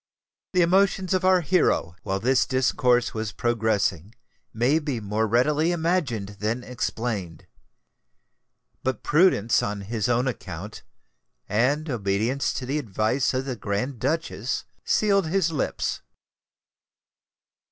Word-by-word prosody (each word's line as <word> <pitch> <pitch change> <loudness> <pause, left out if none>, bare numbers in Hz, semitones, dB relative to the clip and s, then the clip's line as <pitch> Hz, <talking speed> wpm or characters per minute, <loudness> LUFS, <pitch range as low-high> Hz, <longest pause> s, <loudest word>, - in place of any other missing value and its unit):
The 180 -1 +4
emotions 190 +1 +2
of 185 0 +1
our 185 -1 +4
hero, 165 - +1
while 95 0 -2
this 130 +5 +2
discourse 125 -2 +2
was 110 -1 -3
progressing, 110 -5 0 0.4
may 125 +8 +2
be 145 -6 -3
more 105 +1 -1
readily 150 +9 +2
imagined 155 - -1
than 115 +4 -1
explained: 115 -8 -4 1.4
but 130 0 -2
prudence 150 - +3
on 100 0 -3
his 110 +3 -2
own 120 +2 +2
account, 100 -4 -6 0.7
and 135 +9 +1
obedience 115 +2 0
to 130 0 -4
the 140 +4 -1
advice 110 +2 0
of 130 +1 -1
the 130 -2 -3
Grand 110 +4 -3
Duchess, 135 -3 -2 0.2
sealed 200 -4 +2
his 175 -1 +1
lips. 150 - -2
125 Hz, 120 wpm, -25 LUFS, 110-150 Hz, 1.4 s, The